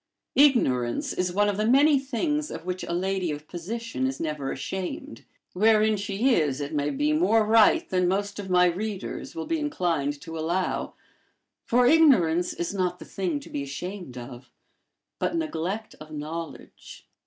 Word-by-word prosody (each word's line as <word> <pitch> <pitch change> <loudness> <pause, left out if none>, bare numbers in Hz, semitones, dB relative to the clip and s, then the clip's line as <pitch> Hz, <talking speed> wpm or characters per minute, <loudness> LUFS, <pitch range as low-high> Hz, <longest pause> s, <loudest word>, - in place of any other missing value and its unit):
Ignorance 130 - +3
is 180 0 -1
one 205 +3 +2
of 205 -1 -1
the 215 +1 +1
many 280 +3 +5
things 295 +3 -2
of 165 - -7
which 180 0 -3
a - - -5
lady 185 0 -1
of 150 0 -5
position 185 - -3
is 135 0 -4
never 150 -4 -3
ashamed; 190 - -5 0.3
wherein 215 +2 +4
she 205 +5 +1
is, 150 - +1
it 145 +2 -4
may 145 -1 0
be, 295 - 0
more 225 -9 +3
right 225 +10 +5
than 180 -1 +1
most 200 +2 -1
of 195 -2 -6
my 180 0 +5
readers 195 +3 -3
will 160 - -4
be 330 - -1
inclined 165 - -1
to 165 0 -7
allow; 175 +4 -1 0.7
for 245 +1 +3
ignorance 210 - +4
is 170 +3 -4
not 180 -2 -1
the - - -11
thing 175 -6 -2
to - - -12
be 145 - -3
ashamed 140 +1 -6
of, 125 0 -9 0.7
but - - -1
neglect 220 - -3
of 155 - -11
knowledge. 155 +2 -8
185 Hz, 165 wpm, -26 LUFS, 160-225 Hz, 0.7 s, many